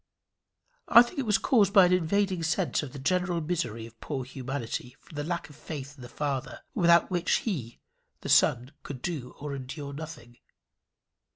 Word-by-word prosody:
I 235 Hz, +1 st, +9 dB
think 240 Hz, +4 st, -7 dB
it 260 Hz, -, -2 dB
was 210 Hz, -2 st, +4 dB
caused 200 Hz, -3 st, +3 dB
by 195 Hz, -4 st, +8 dB
an 180 Hz, -, +3 dB
invading 185 Hz, +1 st, +1 dB
sense 160 Hz, 0 st, 0 dB
of 145 Hz, -4 st, -7 dB
the -, -, -9 dB
general 175 Hz, +5 st, 0 dB
misery 125 Hz, -9 st, -2 dB
of 115 Hz, 0 st, -15 dB
poor 135 Hz, -4 st, -3 dB
humanity 125 Hz, -1 st, -5 dB
from -, -, -16 dB
the 145 Hz, -, -2 dB
lack 170 Hz, +2 st, -3 dB
of 145 Hz, -, -15 dB
that -, -, -21 dB
faith 145 Hz, -2 st, -7 dB
in 135 Hz, -, -14 dB
the 120 Hz, -, -9 dB
Father 140 Hz, -1 st, -3 dB
without 170 Hz, -2 st, +4 dB
which 175 Hz, -1 st, +1 dB
he, 140 Hz, -, -3 dB, 0.4 s
the -, -, -6 dB
Son, 125 Hz, +3 st, +4 dB
could 135 Hz, -4 st, -8 dB
do, 145 Hz, -8 st, -4 dB
or 145 Hz, 0 st, -5 dB
endure, 140 Hz, +2 st, -6 dB
nothing. 150 Hz, -6 st, -9 dB
150 Hz, 185 wpm, -28 LUFS, 130-180 Hz, 0.4 s, I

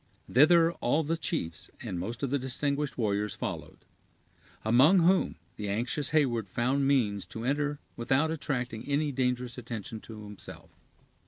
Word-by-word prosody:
Thither 165 Hz, +5 st, +6 dB
all 145 Hz, +7 st, +2 dB
the 160 Hz, +3 st, 0 dB
chiefs, 125 Hz, -, -4 dB
and 90 Hz, -, -4 dB
most 115 Hz, +8 st, -5 dB
of 135 Hz, -, -1 dB
the 140 Hz, -, +2 dB
distinguished 140 Hz, +3 st, -1 dB
warriors, 105 Hz, -3 st, 0 dB
followed; -, -, -6 dB, 0.8 s
among 135 Hz, -, +6 dB
whom 185 Hz, +3 st, +3 dB, 0.2 s
the 105 Hz, -1 st, -3 dB
anxious 120 Hz, +7 st, -1 dB
Heyward 125 Hz, -9 st, +2 dB
found 130 Hz, +7 st, +1 dB
means 105 Hz, -8 st, +2 dB
to 110 Hz, -, -6 dB
enter 145 Hz, +2 st, 0 dB, 0.2 s
without 135 Hz, +7 st, +1 dB
attracting 125 Hz, -7 st, -3 dB
any 145 Hz, +1 st, +1 dB
dangerous 125 Hz, -2 st, -1 dB
attention 115 Hz, -2 st, -6 dB
to 110 Hz, -1 st, -10 dB
himself. 105 Hz, -1 st, -10 dB
125 Hz, 145 wpm, -29 LUFS, 115-145 Hz, 0.8 s, Thither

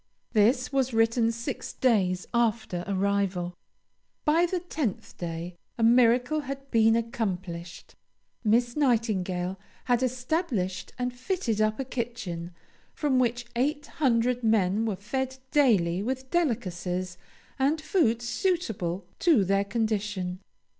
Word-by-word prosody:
This 250 Hz, +5 st, +3 dB
was 260 Hz, -3 st, +1 dB
written 230 Hz, +1 st, +3 dB
six 235 Hz, +3 st, -5 dB
days 190 Hz, -8 st, +2 dB
after 220 Hz, -6 st, 0 dB
arrival. 195 Hz, -2 st, 0 dB, 0.7 s
By 330 Hz, +3 st, +4 dB
the 365 Hz, +1 st, -1 dB
tenth 310 Hz, -, -4 dB
day, 170 Hz, +1 st, -5 dB, 0.2 s
a 230 Hz, -, 0 dB
miracle 245 Hz, +5 st, +4 dB
had 275 Hz, -1 st, -7 dB
been 225 Hz, -1 st, +5 dB
accomplished. 190 Hz, -7 st, -4 dB, 0.5 s
Miss 235 Hz, +2 st, +2 dB
Nightingale 195 Hz, -9 st, 0 dB, 0.3 s
had 245 Hz, -1 st, +2 dB
established 250 Hz, -, -1 dB
and 250 Hz, 0 st, -2 dB
fitted 245 Hz, -, -1 dB
up 215 Hz, +2 st, +1 dB
a 270 Hz, -, -2 dB
kitchen, 230 Hz, -9 st, -4 dB, 0.5 s
from 280 Hz, -4 st, +1 dB
which 240 Hz, -1 st, 0 dB
eight 290 Hz, +4 st, 0 dB, 0.2 s
hundred 245 Hz, -2 st, +2 dB
men 220 Hz, 0 st, +2 dB
were 210 Hz, -, -1 dB
fed 260 Hz, +7 st, -3 dB
daily 195 Hz, -11 st, +3 dB
with 260 Hz, +3 st, -3 dB
delicacies 185 Hz, -, -1 dB, 0.4 s
and 285 Hz, +4 st, +2 dB
food 295 Hz, -, +1 dB
suitable 225 Hz, -, -1 dB
to 300 Hz, -, +4 dB
their 195 Hz, +1 st, +2 dB
condition. 205 Hz, -4 st, -2 dB
230 Hz, 120 wpm, -27 LUFS, 195-260 Hz, 0.7 s, been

